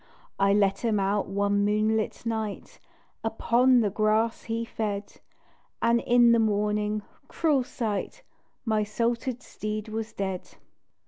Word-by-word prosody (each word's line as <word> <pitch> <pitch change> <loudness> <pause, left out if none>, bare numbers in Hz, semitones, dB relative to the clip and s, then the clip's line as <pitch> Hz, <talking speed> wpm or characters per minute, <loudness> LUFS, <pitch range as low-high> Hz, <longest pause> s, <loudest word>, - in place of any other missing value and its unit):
I 195 0 +4
let 200 -1 +3
him 225 -3 +1
out 195 +1 0
one 200 +1 +1
moonlight 215 +2 0
night 220 -3 -4 0.4
Upon 240 +3 +3
the 205 -3 0
grass 215 +2 +1
he 230 0 -2
fed 210 -3 -4 0.6
And 235 0 +3
in 240 -1 +5
the 235 - +5
morning, 210 -1 0 0.2
cruel 300 -6 +1
sight! 220 -5 -4 0.4
My 215 -2 +1
salted 235 +3 -2
steed 215 0 -5
was 220 0 -4
DEAD. 190 -2 -4
215 Hz, 125 wpm, -27 LUFS, 205-230 Hz, 0.6 s, in